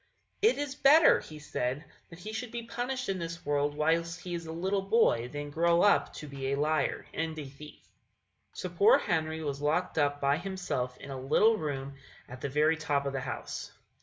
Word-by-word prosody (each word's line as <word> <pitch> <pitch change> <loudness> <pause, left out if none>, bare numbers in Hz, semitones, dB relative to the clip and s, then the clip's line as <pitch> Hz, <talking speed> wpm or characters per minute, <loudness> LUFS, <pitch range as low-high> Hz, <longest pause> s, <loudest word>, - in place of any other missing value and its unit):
"It 445 +4 +4
is 290 -2 -3
better," 295 +3 +6
he 155 - -10
said, 145 -1 -3 0.2
"that 165 - -12
he 215 +5 -8
should 235 +2 -4
be 235 -1 -5
punished 245 +2 -3
in 190 -1 -1
this 170 0 -6
world 145 0 0
whilst 165 +2 0
he 180 -2 -6
is 170 -1 -5
a - - -5
little 190 +4 -1
boy 195 - +2
than 145 +2 -6
grow 170 +2 +3
up 205 - +4
to 150 - -7
be 135 -1 -5
a 140 - 0
liar 155 +1 0
and 160 0 -3
a 150 - -5
thief." 140 +3 -13 0.6
So - - -5
poor 440 +5 +5
Henry 160 -1 -1
was 140 -1 -3
locked 160 +3 0
up 145 -1 +1
by 140 +1 +2
himself 175 -9 -3
in 140 - -9
a 130 -1 -5
little 210 +12 +4
room 140 -6 -4 0.3
at 125 +1 -10
the 140 - -2
very 155 +3 +2
top 145 -3 0
of 140 - -2
the 135 - -2
house. - - -6
160 Hz, 205 wpm, -30 LUFS, 145-190 Hz, 0.6 s, better